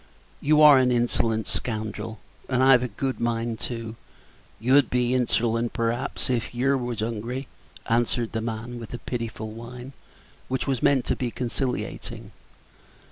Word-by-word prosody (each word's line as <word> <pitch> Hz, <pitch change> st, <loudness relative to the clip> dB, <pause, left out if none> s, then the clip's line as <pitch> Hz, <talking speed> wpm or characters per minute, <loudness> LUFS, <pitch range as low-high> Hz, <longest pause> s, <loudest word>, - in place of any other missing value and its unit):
"You 150 Hz, +1 st, +4 dB
are 145 Hz, -3 st, +9 dB
an 125 Hz, -1 st, +3 dB
insolent 115 Hz, -2 st, +1 dB
scoundrel, 110 Hz, -1 st, -3 dB, 0.3 s
and 130 Hz, 0 st, +2 dB
I've 130 Hz, -2 st, +7 dB
a 125 Hz, -, -1 dB
good 130 Hz, +4 st, -3 dB
mind 115 Hz, -1 st, -1 dB
to 115 Hz, -2 st, -5 dB, 0.3 s
" -, -, -30 dB
"You'd 130 Hz, +3 st, +4 dB
be 125 Hz, -1 st, +1 dB
hinserlent, 120 Hz, -2 st, +1 dB
p'raps, 115 Hz, +2 st, -1 dB
if 120 Hz, -2 st, -1 dB
yer 135 Hz, +3 st, +2 dB
was 120 Hz, -4 st, -2 dB
hungry," 115 Hz, +4 st, -3 dB, 0.4 s
answered 120 Hz, 0 st, +1 dB
the 110 Hz, -, -2 dB
man, 115 Hz, +2 st, -4 dB
with 115 Hz, +1 st, -7 dB
a -, -, -11 dB
pitiful 115 Hz, -2 st, -4 dB
whine, 120 Hz, +4 st, -9 dB, 0.5 s
which 130 Hz, 0 st, -1 dB
was 135 Hz, -4 st, -1 dB
meant 135 Hz, -3 st, +3 dB
to -, -, 0 dB
be 125 Hz, -, -2 dB
conciliating. 125 Hz, +2 st, -4 dB
120 Hz, 150 wpm, -25 LUFS, 115-130 Hz, 0.5 s, are